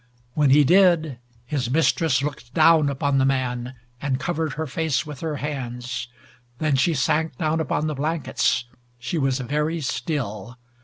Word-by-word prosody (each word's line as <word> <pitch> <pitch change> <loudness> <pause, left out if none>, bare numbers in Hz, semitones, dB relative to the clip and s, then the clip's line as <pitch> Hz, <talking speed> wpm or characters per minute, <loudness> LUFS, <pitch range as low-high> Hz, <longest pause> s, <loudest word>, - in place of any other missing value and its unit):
When 145 -1 +3
he 145 +2 +6
did, 165 -5 +4 0.3
his 125 -2 -2
mistress 150 -1 +2
looked 135 -4 -6
down 160 -2 +5
once - - +1
upon 140 0 +1
the 135 - +3
man 130 -2 -1 0.3
and 135 -2 -1
covered 160 -2 -2
her 160 +2 -3
face 160 +1 -1
with 150 -3 -8
her 160 -2 -3
hands. 125 -4 -4 0.5
Then 155 -1 +1
she 155 +5 +2
sank 150 +1 0
down 160 0 0
upon 155 0 -1
the 155 - -1
blankets. 150 -3 0 0.3
She 125 +7 -3
was 135 -2 +1
very 150 +6 -1
still. 125 - -3
145 Hz, 160 wpm, -23 LUFS, 130-160 Hz, 0.5 s, he